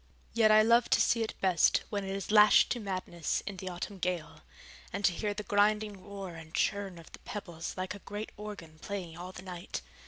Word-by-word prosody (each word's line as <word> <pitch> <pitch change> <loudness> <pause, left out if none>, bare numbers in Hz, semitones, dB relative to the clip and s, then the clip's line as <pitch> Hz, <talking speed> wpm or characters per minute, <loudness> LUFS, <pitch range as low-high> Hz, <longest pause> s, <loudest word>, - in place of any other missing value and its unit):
Yet 225 -2 +5
I 215 0 +7
love 235 +1 +4
to - - -2
see 230 - +3
it 220 - -3
best 185 -4 +4
when 205 -2 -1
it 190 - -5
is 195 +1 -4
lashed 210 -1 +7
to 245 - 0
madness 185 -5 -2
in 200 -2 -5
the 185 +1 -5
autumn 180 +2 -6
gale, 175 -3 -3 0.5
and 200 - -1
to 180 - +4
hear 205 +3 -2
the 210 - -4
grinding 205 -1 +1
roar 195 -3 -7
and 160 -1 -10
churn 200 -3 0
of 165 - -13
the - - -11
pebbles 170 -5 -6
like 185 0 -3
a 205 - -9
great 205 +2 -6
organ 200 -7 -9
playing 185 -4 -5
all 180 +2 -7
the 180 - -10
night. 180 - -6
195 Hz, 215 wpm, -31 LUFS, 180-210 Hz, 0.5 s, I